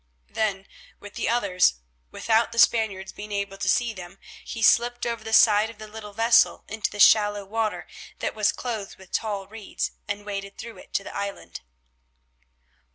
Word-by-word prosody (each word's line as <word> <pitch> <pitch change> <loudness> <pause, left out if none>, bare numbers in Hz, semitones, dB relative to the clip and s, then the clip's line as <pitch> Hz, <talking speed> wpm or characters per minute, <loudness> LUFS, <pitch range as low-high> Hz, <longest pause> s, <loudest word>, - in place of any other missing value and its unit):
Then 200 -3 -1 0.3
with 205 0 -12
the - - -2
others, 200 - +2 0.3
without 230 - +1
the 235 - -9
Spaniards 220 -5 +2
being 210 0 -9
able 200 -1 -3
to - - -1
see 240 -2 +2
them, 180 -1 -10 0.3
he 225 - -5
slipped 240 +2 +3
over 235 -2 -3
the 220 - -6
side 215 -1 +5
of 225 - -12
the 215 0 -10
little 210 -1 -9
vessel 230 +3 +3
into 220 -1 -2
the 205 - -10
shallow 205 0 +5
water 220 +1 -2 0.3
that - - -3
was 210 -1 +2
clothed 220 -5 -5
with 190 -1 -16
tall 205 -3 -2
reeds, 215 0 -5 0.2
and 205 0 -4
waded 200 -1 -6
through 235 -1 -9
it - - -16
to 195 - +1
the - - -9
island. 200 0 -6
210 Hz, 175 wpm, -25 LUFS, 200-225 Hz, 0.3 s, side